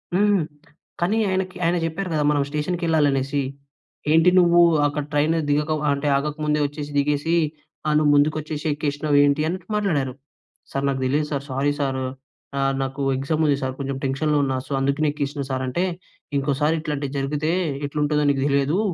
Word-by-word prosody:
హ్మ్. 205 -1 +3 0.6
కానీ 200 +6 +2
ఆయనకి 185 0 -2
ఆయన 170 +1 +2
చెప్పారు 175 +3 -3
కదా! 150 -1 +1
మనం 145 - +2
స్టేషన్‍కి 160 +4 -2
వెళ్ళాలి 160 -3 +3
అనేసి, 135 +1 -1 0.7
"ఏంటి 165 +3 +6
నువ్వు 175 -1 +5 0.3
అక్కడ 145 0 -2
ట్రైన్ 150 +3 +2
దిగక 150 +2 +1 0.2
అంటే 140 +1 -1
ఆగకముందే 150 +1 -1
వచ్చేసి, 145 0 -5
దిగేసి 150 +3 +1 0.5
ఆహ్, 150 - +2
నువ్వు 150 -1 +3
ముందుకొచ్చేసి, 150 +1 0
ఎక్కేసినావు 145 0 0
ఏంటి" 145 +1 +2
అన్నటు 180 +1 -4
మాట్లాడారు. 155 -11 0 0.6
"సార్ 135 0 -2
నాకు 135 -1 -1
తెలీదు 150 +3 +1
సార్. 140 -1 -2
Sorry 140 +2 +1
sir. 135 -2 -1 0.6
ఆహ్, 135 0 +2
నాకు 135 +1 -4 0.2
ఎగ్జామ్ 155 +4 0
ఉంది 140 -1 +3
సార్. 130 0 -1
కొంచెం 135 -1 -3
టెన్షన్‌లో 145 +3 +1
ఉన్నా. 135 -1 0
సో, - - -13
అందుకనే 140 +3 +1
ఎక్కేసినా 145 -1 -3
సార్. 130 0 -1
అంటే, 170 +8 -1 0.5
"ఇంకోసారి 145 +3 +1
ఇట్లాంటివి 145 -3 -3
జరిగితే 150 +3 -1 0.4
ఎట్లుంటుందో 150 0 0
నీకు 135 -1 -1
తెలియదు. 140 +6 +2
150 Hz, 160 wpm, -23 LUFS, 140-155 Hz, 0.7 s, ఏంటి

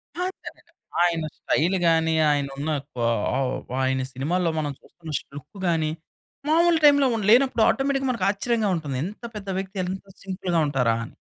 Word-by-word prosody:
అలా 360 +1 -1 0.2
కదండీ. - - -9 0.4
ఆయన 165 -2 +1
స్టైల్‌గాని, 165 -1 +2 0.2
ఆయన 140 -1 0
ఉన్న 150 +3 -3 0.3
కొ 120 - -3 0.4
ఆహ్, 130 -2 0 0.3
ఆయన 130 0 +1
సినిమాల్లో 165 +6 0
మనం 145 -2 -2
చూస్తున్న 165 -3 -11 0.3
లుక్కు 190 +8 -12
గాని, 160 -2 +1 0.6
మావులు 335 +1 +4
టైమ్‌లో 285 -2 +6
ఉం 220 - -2
లేనప్పుడు 250 -2 +5
ఆటోమేటిక్‌గా, 270 -1 0
మనకు 230 - 0
ఆశ్చర్యంగా 220 0 0
ఉంటుంది. 140 -5 -4
ఎంత 210 +5 -9
పెద్ద 200 -2 -6
వ్యక్తి, 195 +1 -7
ఎంత 190 +2 -5 0.2
సింపుల్‌గా 185 -3 -1
ఉంటారా! 125 -5 +1
అని. - - -14
180 Hz, 155 wpm, -24 LUFS, 155-230 Hz, 0.6 s, టైమ్‌లో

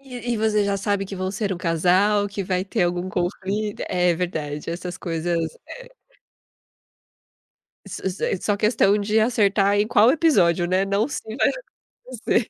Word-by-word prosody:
E 245 -3 -5
e - - 0
você 215 -1 +1
já 200 0 0
sabe 200 0 -1
que 195 - -7
vão 185 0 -2
ser 200 0 -2
um 175 - -5
casal, 185 +4 +2
que 200 0 -4
vai 185 0 -1
ter 200 -1 -1
algum 175 +1 -2
conflito. 195 +3 -3
É 180 -1 +2
verdade, 155 -4 -4
essas 180 +1 -5
coisas, 170 0 -2 0.6
é. - - -35 1.7
Iss - - -7
iss 190 0 -4
daí - - -1
só 205 -1 0
questão 210 -1 +3
de 210 +2 +1
acertar 205 -3 +2
em 210 - +1
qual 235 0 +5
episódio, 190 - +3
né? 185 +2 +1
Não 200 +4 0
se 290 - -5 0.2
vai - - +3 0.4
acontecer. 245 -2 -3
200 Hz, 170 wpm, -23 LUFS, 180-215 Hz, 1.7 s, qual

